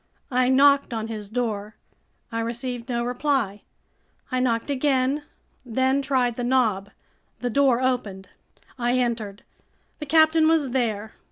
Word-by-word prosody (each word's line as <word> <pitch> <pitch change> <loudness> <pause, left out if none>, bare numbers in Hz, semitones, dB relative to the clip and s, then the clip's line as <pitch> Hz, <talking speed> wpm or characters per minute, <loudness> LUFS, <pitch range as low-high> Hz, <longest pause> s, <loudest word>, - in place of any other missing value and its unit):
I 250 0 +2
knocked 280 -1 +4
on 220 0 -4
his 210 -3 -6
door. 215 -3 -3 0.6
I 230 - -2
received 240 +1 -4
no 235 -1 -1
reply. 245 -5 -1 0.7
I 255 - 0
knocked 245 +1 0
again, 270 0 +1 0.4
then 260 +3 +1
tried 255 -4 0
the 245 - -2
knob. 225 -6 +1 0.5
The 245 -1 -1
door 265 -2 +3
opened. 210 -7 -2 0.5
I 245 +1 +1
entered. 225 -5 -2 0.6
The 300 - -6
captain 315 +1 +5
was 315 -5 +2
there. 220 -4 -1
245 Hz, 135 wpm, -24 LUFS, 225-265 Hz, 0.7 s, captain